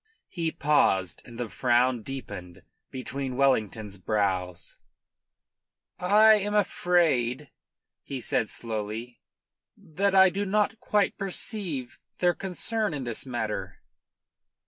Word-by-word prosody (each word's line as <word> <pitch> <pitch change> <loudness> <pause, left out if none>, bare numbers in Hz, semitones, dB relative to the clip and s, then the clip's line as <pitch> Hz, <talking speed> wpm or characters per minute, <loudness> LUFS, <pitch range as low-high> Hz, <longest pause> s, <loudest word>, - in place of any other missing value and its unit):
He 165 -3 -2
paused, 95 - +2
and 120 -1 -11
the 120 - -2
frown 125 0 +2
deepened 100 -9 -8 0.3
between 130 0 -5
Wellington's 110 -7 +1
brows. 95 -3 -2 1.2
"I 215 +4 +6
am 205 +1 -2
afraid," 150 - +1 0.5
he 135 - -6
said 110 -2 0
slowly, 110 +1 -5 0.6
"that 195 +5 -1
I 190 -1 +7
do 200 +3 -2
not 210 +2 +1
quite 210 -3 +1
perceive 185 - -3 0.2
their 175 -1 +3
concern 195 +1 -2
in 140 - -4
this 120 +2 -4
matter." 110 -4 -4
135 Hz, 105 wpm, -27 LUFS, 110-190 Hz, 1.2 s, I